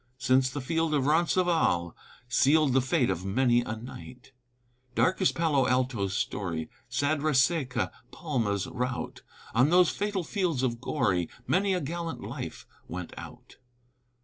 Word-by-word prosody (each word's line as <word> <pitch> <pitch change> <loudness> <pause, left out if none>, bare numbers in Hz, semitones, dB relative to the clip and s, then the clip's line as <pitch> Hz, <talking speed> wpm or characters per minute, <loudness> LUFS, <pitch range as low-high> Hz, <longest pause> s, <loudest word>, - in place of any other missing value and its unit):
Since 130 0 +3
the 145 +2 -5
field 160 +3 0
of 135 -3 +1
Roncesvalles 160 - +2 0.3
Sealed 140 +3 +3
the 135 - +4
fate 130 0 +1
of 85 - -3
many 120 +4 +2
a 110 -2 -4
knight. 125 +2 -11 0.6
Dark 185 +2 +2
is 190 - +4
Palo 150 -6 +1
Alto's 125 -7 0
story, 85 -5 -3 0.2
Sad 145 +2 0
Reseca 135 -3 +1 0.2
Palma's 115 - -1
rout, 125 0 -4 0.3
On 125 +5 +4
those 180 0 +5
fatal 205 -2 -2
fields 175 - -1
so 130 - +2
gory, 115 - -1 0.2
Many 190 +4 +2
a 180 - -1
gallant 165 +3 -4
life - - -6 0.2
went 90 0 -6
out. - - -11
130 Hz, 140 wpm, -28 LUFS, 120-165 Hz, 0.6 s, those